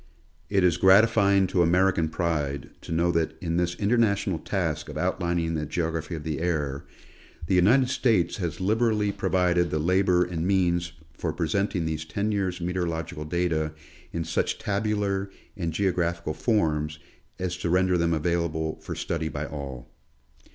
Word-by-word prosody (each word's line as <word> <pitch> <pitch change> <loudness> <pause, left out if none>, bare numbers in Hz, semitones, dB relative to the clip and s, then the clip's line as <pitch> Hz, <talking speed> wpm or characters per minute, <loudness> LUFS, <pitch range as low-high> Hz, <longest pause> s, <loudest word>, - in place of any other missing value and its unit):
It 100 -2 +2
is 85 -2 +3
gratifying 100 +1 +5
to 90 -1 +1
American 85 -1 +3
pride 75 -5 -2
to - - -9
know 85 +1 +2
that 85 -2 -1
in 85 -2 -2
this 85 0 0
international 100 -4 +1
task 80 -6 -2
of - - -6
outlining 85 -1 0
the 75 -2 -2
geogi'aphy 80 -1 -2
of 80 - -6
the 80 -2 -3
air, 75 -5 -2 0.6
the 85 - -1
United 115 +9 +5
States 115 -8 +1
has 85 -6 -3
liberally 105 +1 +1
provided 90 -3 +1
the 75 - -1
labor 90 +2 +3
and 85 -1 -3
means 85 -3 +1 0.2
for - - -3
presenting 90 +1 -1
these 80 -1 -2
ten 100 +8 -2
years' 95 -3 -1
meteorological 85 -3 -3
data 80 -2 -1 0.4
in 85 - -2
such 80 +1 -1
tabular 100 -1 -1 0.3
and 85 -5 -2
geographical 85 -3 0
forms 75 -3 0 0.4
as 90 -1 -2
to 90 -1 -2
render 90 +1 +3
them 85 -1 +1
available 80 -1 -1
for - - -6
study 80 -1 -2
by 75 +1 -4
all. 70 -5 -7
85 Hz, 150 wpm, -26 LUFS, 80-95 Hz, 0.6 s, gratifying